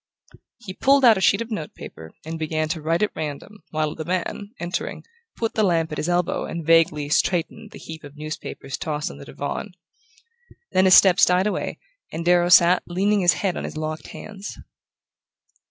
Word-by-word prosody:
He 190 Hz, -6 st, -8 dB
pulled 275 Hz, +5 st, +4 dB
out 225 Hz, -5 st, +6 dB
a -, -, -5 dB
sheet 200 Hz, +4 st, +3 dB
of 230 Hz, -, -15 dB
note 160 Hz, -8 st, -5 dB
paper 80 Hz, 0 st, -10 dB, 0.2 s
and 160 Hz, 0 st, -5 dB
began 155 Hz, 0 st, -1 dB
to 160 Hz, -1 st, -3 dB
write 165 Hz, +5 st, 0 dB
at 210 Hz, -, -1 dB
random, 155 Hz, +7 st, -6 dB
while 155 Hz, -1 st, -1 dB
the 160 Hz, -, -6 dB
man, 185 Hz, +3 st, -3 dB
entering, 175 Hz, +1 st, -4 dB, 0.3 s
put 225 Hz, -1 st, -2 dB
the 220 Hz, -, 0 dB
lamp 165 Hz, -5 st, +1 dB
at 150 Hz, -, -4 dB
his 160 Hz, -, -2 dB
elbow 175 Hz, 0 st, 0 dB
and 165 Hz, -1 st, -6 dB
vaguely 165 Hz, -3 st, +3 dB
"straightened" 175 Hz, +7 st, 0 dB
the -, -, -12 dB
heap 160 Hz, 0 st, -10 dB
of 145 Hz, 0 st, -12 dB
newspapers 150 Hz, -2 st, -6 dB
tossed 150 Hz, -2 st, -3 dB
on -, -, -12 dB
the -, -, -10 dB
divan. -, -, -5 dB, 1.0 s
Then 185 Hz, 0 st, +3 dB
his 185 Hz, -, +8 dB
steps 190 Hz, -3 st, +6 dB
died 180 Hz, +1 st, +2 dB
away 210 Hz, -, -2 dB, 0.3 s
and 165 Hz, +1 st, -5 dB
Darrow 175 Hz, 0 st, +4 dB
sat 180 Hz, 0 st, +6 dB
leaning 200 Hz, +4 st, +1 dB
his 175 Hz, -2 st, +4 dB
head 185 Hz, -, +1 dB
on -, -, -4 dB
his -, -, -6 dB
locked 155 Hz, 0 st, -4 dB
hands. 205 Hz, -1 st, -9 dB
175 Hz, 190 wpm, -23 LUFS, 155-190 Hz, 1.0 s, his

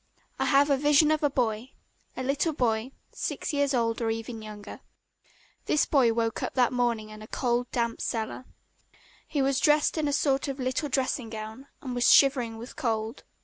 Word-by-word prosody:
I -, -, +1 dB
have 285 Hz, 0 st, +4 dB
a 275 Hz, -, +4 dB
vision 295 Hz, +2 st, +4 dB
of 310 Hz, -, +1 dB
a 290 Hz, -, +3 dB
boy, 245 Hz, -2 st, -2 dB, 0.4 s
a 260 Hz, -, -3 dB
little 285 Hz, +5 st, 0 dB
boy, 235 Hz, -2 st, 0 dB, 0.2 s
six -, -, -4 dB
years 285 Hz, -1 st, +1 dB
old 230 Hz, -1 st, 0 dB
or 225 Hz, -, 0 dB
even 225 Hz, 0 st, -4 dB
younger. 210 Hz, -1 st, -9 dB, 0.9 s
This 300 Hz, -, +3 dB
boy 260 Hz, -6 st, +3 dB
woke 225 Hz, 0 st, -1 dB
up -, -, -4 dB
that 250 Hz, -1 st, +3 dB
morning 235 Hz, -3 st, 0 dB
in 215 Hz, 0 st, -11 dB
a 215 Hz, -, -10 dB
cold 245 Hz, 0 st, -1 dB
damp 235 Hz, -1 st, -2 dB
cellar. 225 Hz, +2 st, -3 dB, 0.8 s
He 285 Hz, -3 st, 0 dB
was 270 Hz, 0 st, +1 dB
dressed 300 Hz, +2 st, +3 dB
in 305 Hz, -, 0 dB
a -, -, 0 dB
sort 275 Hz, 0 st, +1 dB
of 275 Hz, 0 st, -4 dB
little 260 Hz, +4 st, -1 dB
dressing 260 Hz, -3 st, -1 dB
gown 220 Hz, +4 st, -8 dB, 0.2 s
and 255 Hz, -2 st, -4 dB
was 245 Hz, 0 st, +4 dB
shivering 250 Hz, -5 st, +4 dB
with 235 Hz, +3 st, -10 dB
cold. 225 Hz, -2 st, -3 dB
250 Hz, 190 wpm, -27 LUFS, 225-275 Hz, 0.9 s, have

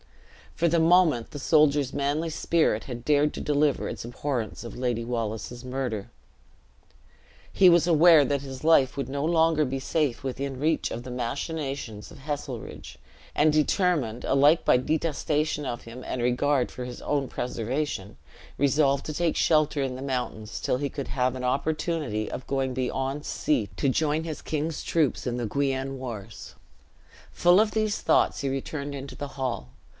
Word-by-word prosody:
For 170 Hz, -, +2 dB
the 170 Hz, +1 st, +3 dB
moment 160 Hz, -7 st, +4 dB
the 145 Hz, -, -6 dB
soldier's 145 Hz, -2 st, +3 dB
manly 145 Hz, +4 st, 0 dB
spirit 160 Hz, -7 st, +1 dB
had 120 Hz, -2 st, -7 dB
dared 150 Hz, 0 st, +3 dB
to -, -, -5 dB
deliver 150 Hz, -1 st, +1 dB
its -, -, -5 dB
abhorrence 120 Hz, -1 st, -4 dB
of 115 Hz, -, -8 dB
Lady 120 Hz, -2 st, -1 dB
Wallace's 115 Hz, 0 st, -4 dB
murder, 125 Hz, -5 st, -4 dB, 1.4 s
he 185 Hz, -2 st, +7 dB
was 170 Hz, 0 st, +4 dB
aware 165 Hz, -2 st, +7 dB
that 140 Hz, +1 st, 0 dB
his 135 Hz, -1 st, -8 dB
life 140 Hz, -5 st, +4 dB
would 135 Hz, -2 st, -3 dB
no 140 Hz, +1 st, -2 dB
longer 160 Hz, -1 st, +3 dB
be 135 Hz, -1 st, -2 dB
safe 145 Hz, -1 st, -1 dB
within 135 Hz, 0 st, -4 dB
reach 155 Hz, +2 st, 0 dB
of 120 Hz, -, -5 dB
the 125 Hz, -, -7 dB
machinations 130 Hz, -2 st, -4 dB
of -, -, -12 dB
Heselrigge; 135 Hz, -, -6 dB, 0.4 s
and 150 Hz, +1 st, +4 dB
determined, 150 Hz, -, +1 dB
alike 145 Hz, +4 st, +4 dB
by -, -, +5 dB
detestation 150 Hz, +1 st, -1 dB
of 120 Hz, -2 st, -4 dB
him 120 Hz, +2 st, -9 dB
and 125 Hz, -, -3 dB
regard 125 Hz, +2 st, +1 dB
for 125 Hz, -, -6 dB
his 125 Hz, -1 st, -8 dB
own 140 Hz, -2 st, 0 dB
preservation, 120 Hz, -3 st, -3 dB, 0.4 s
resolved 140 Hz, 0 st, +2 dB
to 155 Hz, -, -4 dB
take 165 Hz, +1 st, 0 dB
shelter 155 Hz, -2 st, +2 dB
in 130 Hz, -2 st, -2 dB
the 130 Hz, -, -7 dB
mountains, 125 Hz, -6 st, -4 dB
till -, -, 0 dB
he 140 Hz, +1 st, -2 dB
could 140 Hz, -1 st, -6 dB
have 125 Hz, -1 st, 0 dB
an 130 Hz, -, -5 dB
opportunity 140 Hz, -4 st, -1 dB
of 130 Hz, -, -6 dB
going 135 Hz, -1 st, -1 dB
beyond 130 Hz, +3 st, -2 dB
sea 120 Hz, -10 st, 0 dB
to -, -, 0 dB
join 150 Hz, +3 st, +1 dB
his 155 Hz, -2 st, -5 dB
king's 155 Hz, 0 st, -3 dB
troops 155 Hz, -6 st, 0 dB
in 125 Hz, -1 st, -2 dB
the 120 Hz, -, -2 dB
Guienne 135 Hz, +2 st, -1 dB
wars. 115 Hz, -4 st, -8 dB, 0.8 s
Full 175 Hz, +2 st, +5 dB
of 215 Hz, 0 st, +3 dB
these 215 Hz, -1 st, 0 dB
thoughts -, -, +2 dB
he 140 Hz, -, -1 dB
returned 140 Hz, +2 st, -4 dB
into 140 Hz, 0 st, -7 dB
the 145 Hz, -, -6 dB
hall. 125 Hz, -, -2 dB
140 Hz, 165 wpm, -26 LUFS, 125-155 Hz, 1.4 s, he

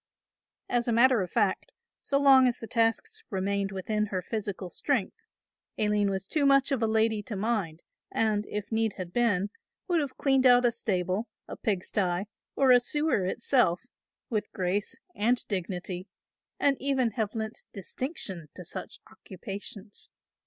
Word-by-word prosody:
As 240 Hz, 0 st, 0 dB
a -, -, +2 dB
matter 240 Hz, 0 st, +5 dB
of 180 Hz, -, -3 dB
fact, 220 Hz, -, 0 dB, 0.3 s
so 275 Hz, -, +1 dB
long 270 Hz, -2 st, +7 dB
as 245 Hz, -, 0 dB
the -, -, -7 dB
tasks 235 Hz, -, 0 dB
remained 200 Hz, -1 st, -1 dB
within 210 Hz, +3 st, -1 dB
her 185 Hz, -2 st, -3 dB
physical 200 Hz, -3 st, -4 dB
strength, 285 Hz, -, -2 dB, 0.5 s
Aline 210 Hz, -1 st, +2 dB
was 190 Hz, -1 st, -2 dB
too 295 Hz, +8 st, 0 dB
much 275 Hz, 0 st, +4 dB
of 265 Hz, -4 st, +1 dB
a 225 Hz, -, +3 dB
lady 220 Hz, -1 st, +2 dB
to 210 Hz, +1 st, -6 dB
mind 195 Hz, -6 st, -2 dB, 0.3 s
and, 215 Hz, -2 st, +1 dB
if 210 Hz, +1 st, -4 dB
need 220 Hz, -1 st, +1 dB
had 180 Hz, -2 st, -7 dB
been, 205 Hz, -5 st, +1 dB, 0.4 s
would 350 Hz, -3 st, +2 dB
have 275 Hz, -3 st, -5 dB
cleaned 270 Hz, -2 st, +4 dB
out 245 Hz, 0 st, +6 dB
a 240 Hz, -, +4 dB
stable, 195 Hz, -2 st, -1 dB, 0.2 s
a -, -, -6 dB
pigsty 185 Hz, -2 st, 0 dB, 0.3 s
or 270 Hz, -2 st, +4 dB
a 250 Hz, -, +8 dB
sewer 295 Hz, -5 st, 0 dB
itself, 190 Hz, -3 st, +2 dB, 0.5 s
with 215 Hz, -4 st, -2 dB
grace 190 Hz, +3 st, -1 dB, 0.2 s
and 240 Hz, +4 st, +1 dB
dignity 185 Hz, -1 st, -4 dB, 0.5 s
and 280 Hz, -1 st, +3 dB
even 265 Hz, -4 st, +1 dB
have 215 Hz, 0 st, -2 dB
lent 220 Hz, 0 st, -4 dB
distinction 195 Hz, -, -5 dB
to 180 Hz, -, -8 dB
such -, -, -6 dB
occupations. 200 Hz, +1 st, -8 dB
220 Hz, 155 wpm, -28 LUFS, 195-250 Hz, 0.5 s, a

